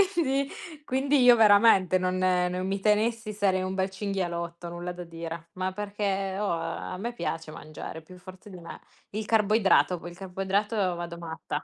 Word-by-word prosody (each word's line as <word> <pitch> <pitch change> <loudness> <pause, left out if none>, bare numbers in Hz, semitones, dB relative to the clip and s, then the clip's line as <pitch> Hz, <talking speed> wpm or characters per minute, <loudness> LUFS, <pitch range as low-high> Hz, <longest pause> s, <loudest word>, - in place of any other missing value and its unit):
Quindi 275 -4 +1 0.4
quindi 270 +1 +2
io 245 -1 +8
veramente 205 -4 +6
non 185 0 0
non 180 0 +1
mi 195 +1 -1
tenessi 215 +1 +1
sarei 195 -2 +1
un 185 0 -3
bel 190 0 0
cinghialotto, 175 -4 -4
nulla 175 +1 -5
da 180 0 -7
dire. 165 0 -7
Ma 185 0 -2
perché, 200 -1 -2
oh, 205 -1 0
a 165 +2 -4
me 235 +5 -4
piace 165 -8 -4
mangiare 155 +1 -8
è - - -16
più 180 +3 -14
forte 185 +2 -13
di 185 - -10
me. 170 - -9 0.3
Il 215 +1 -3
carboidrato, 210 -4 +3
poi 175 - -8
il 175 - -14
carboidrato 195 +3 -1 0.2
vado 170 0 -6
matta. 160 -1 -5
190 Hz, 175 wpm, -27 LUFS, 175-210 Hz, 0.4 s, io